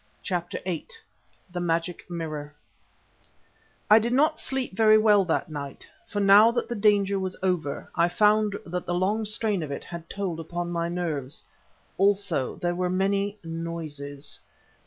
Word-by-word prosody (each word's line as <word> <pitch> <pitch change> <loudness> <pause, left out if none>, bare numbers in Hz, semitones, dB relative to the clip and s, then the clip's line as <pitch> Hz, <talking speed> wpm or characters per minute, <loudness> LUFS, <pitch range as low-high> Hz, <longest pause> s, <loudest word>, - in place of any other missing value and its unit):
CHAPTER 175 -2 -2
VIII 180 -3 -3 0.6
THE 175 - -3
MAGIC 170 +1 -2
MIRROR 155 -4 -5 1.3
I 215 +1 +8
did 235 +2 -1
not 305 +4 +3
sleep 265 -7 -2
very 215 0 +6
well 210 -2 +5
that 165 0 -1
night, 140 -2 -7 0.2
for 205 - -3
now 200 +3 +7
that 240 - -1
the 240 - -3
danger 200 -2 +3
was 185 -1 -4
over 175 -6 -1
I 170 0 +3
found 210 +2 +3
that 180 +1 -4
the 175 - 0
long 205 +5 +1
strain 210 -2 -1
of 155 - -4
it 140 - -5
had 170 -1 -9
told 190 -5 -3
upon 175 +2 -4
my 170 0 -1
nerves. 160 -6 -3 0.6
Also 195 -8 +2
there 175 0 -1
were 180 0 -1
many 200 +2 0
noises. 155 -4 -5
180 Hz, 155 wpm, -26 LUFS, 165-205 Hz, 1.3 s, I